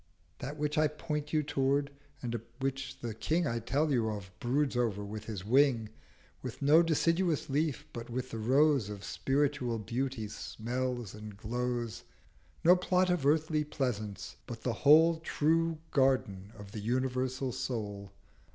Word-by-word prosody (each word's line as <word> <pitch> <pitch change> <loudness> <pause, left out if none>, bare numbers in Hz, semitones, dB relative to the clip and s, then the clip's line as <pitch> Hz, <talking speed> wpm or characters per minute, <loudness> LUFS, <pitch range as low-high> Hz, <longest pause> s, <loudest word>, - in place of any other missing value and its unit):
That 145 +4 -5
which 150 +1 0
I 155 - +5
point 150 0 -4
you 155 -1 +2
tow'rd, 140 0 +1 0.3
and 120 -2 -2 0.2
which 135 0 -3
the 115 -2 -3
King 160 +10 0
I 115 -4 -1
tell 145 +7 0
you 115 -4 +2
of 100 -3 -6
broods 135 +3 +1
over 110 -4 0
with 105 +1 -6
his 100 -4 -5
Wing, 125 -2 +3 0.5
With - - -6
no 150 +4 +6
deciduous 165 -1 +1
leaf, 150 0 0
but 115 0 -6
with 125 +2 -4
the 115 - -4
Rose 135 0 +3
Of 100 -2 -7
Spiritual 135 0 0
Beauty, 120 +1 -2
smells 120 +1 -4
and 105 -1 -9
glows: 120 +1 -3 0.6
No 175 +2 +8
plot 180 0 +2
of 165 -6 +1
Earthly 155 0 +2
Pleasance, 115 - -3
but - - -7
the - - 0
whole 160 +3 +6
True 165 +1 +1
Garden 120 -8 +1
of 100 -2 -10
the 105 - -5
Universal 130 +3 -1
Soul.' 105 -5 -4
130 Hz, 150 wpm, -32 LUFS, 115-150 Hz, 0.6 s, No